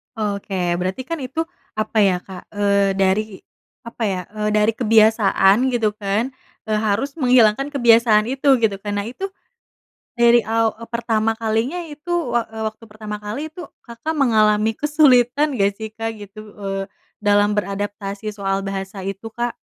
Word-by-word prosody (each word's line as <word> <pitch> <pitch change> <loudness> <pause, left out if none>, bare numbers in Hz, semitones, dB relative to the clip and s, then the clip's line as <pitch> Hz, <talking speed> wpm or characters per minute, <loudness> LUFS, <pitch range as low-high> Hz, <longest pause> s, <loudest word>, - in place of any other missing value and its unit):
Oke, 200 -2 -3 0.2
berarti, 190 +8 -3
kan, 330 +3 -4
itu 270 +5 -3 0.3
apa, 215 +1 -2
ya, 190 -3 +4
Kak, 190 -2 -11
eee, 200 -1 +2
dari 195 +2 +2 0.6
apa, 235 -1 -6
ya, 185 -2 -2
eee, 210 0 -2
dari 210 +1 +3
kebiasaan, 215 -3 +4 0.2
gitu, 220 -3 +1
kan, 215 +5 -1 0.4
eee, 215 -1 +1
harus 220 +6 0
menghilangkan 250 0 +4
kebiasaan 230 -4 +5
itu, 270 0 +3
gitu, 205 -3 +1
kan. 205 0 -4
Nah, - - -7
itu 385 +10 -5 0.9
dari 235 -1 +5
aw 225 0 +2
eee, 230 - -9
pertama 225 -1 0
kalinya 225 +10 -1
itu 320 +2 -7 0.2
wak 235 -1 0
eee, 220 0 -5
waktu 220 +1 -18
pertama 215 -1 -7
kali 220 +10 -5
itu 345 +2 -9 0.2
Kakak 235 +7 -5
mengalami 220 -5 +3
kesulitan 290 -2 +3
nggak, 200 0 +3
sih, 220 +1 -7
Kak, 225 +1 -4
gitu, 205 0 -11
eee, 195 -1 -4 0.4
dalam 205 0 +3
beradaptasi 205 +1 -3
soal 195 -1 -2
bahasa 195 0 -5
itu, 195 +3 -6
Kak? 240 0 -3
220 Hz, 155 wpm, -20 LUFS, 205-240 Hz, 0.9 s, kebiasaan